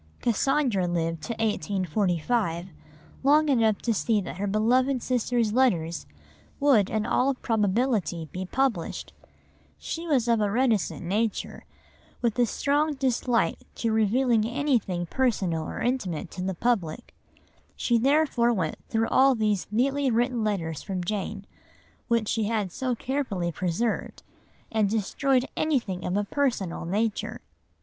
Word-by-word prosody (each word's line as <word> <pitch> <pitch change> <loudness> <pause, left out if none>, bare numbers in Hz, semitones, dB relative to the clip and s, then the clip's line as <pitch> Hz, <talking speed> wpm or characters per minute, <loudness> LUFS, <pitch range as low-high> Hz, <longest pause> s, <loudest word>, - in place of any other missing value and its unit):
Cassandra 245 -5 +1
lived 165 -2 -1
to 235 - -3
1845, 190 -3 -1 0.5
long 295 +3 +4
enough 225 -6 +2
to 235 - +1
see 220 +1 +1
that 185 - -6
her 205 +1 -2
beloved 245 +5 +2
sister's 240 -3 0
letters 175 -10 +1 0.5
would 265 -9 +4
in 215 -1 -1
all 270 +2 +2
probability 210 - 0
be 185 - -4
published; 230 -3 -2 0.6
she 335 +1 -5
was 260 -7 +2
of 230 -2 +3
a 205 - +2
reticent 225 -6 +1
nature, 210 +4 -2 0.5
with 235 0 0
a 240 - +4
strong 290 +5 +1
dislike 255 -3 +1 0.2
to 230 - -1
revealing 220 +2 +2
anything 235 -8 0
personal 185 -8 0
or - - -5
intimate 225 -11 -2
to 180 - -6
the 190 0 -2
public, 195 -7 -1 0.6
she 235 -1 +1
therefore 270 -2 +3
went 185 -9 -1
through 225 0 +1
all 270 0 +5
these 210 -4 0
neatly 270 +5 +1
written 240 0 +1
letters 165 -8 -2
from 185 -2 -4
Jane, 200 +1 -3 0.6
which 230 -3 +1
she 220 0 0
had 210 -4 -1
so 255 +5 -2
carefully 230 -10 -2
preserved, 185 +7 -2 0.5
and 215 -3 +2
destroyed 250 +5 +1
anything 235 - -1
of 180 +2 -1
a 205 - +1
personal 205 -9 -1
nature. 210 +5 -2
225 Hz, 135 wpm, -26 LUFS, 190-255 Hz, 0.6 s, all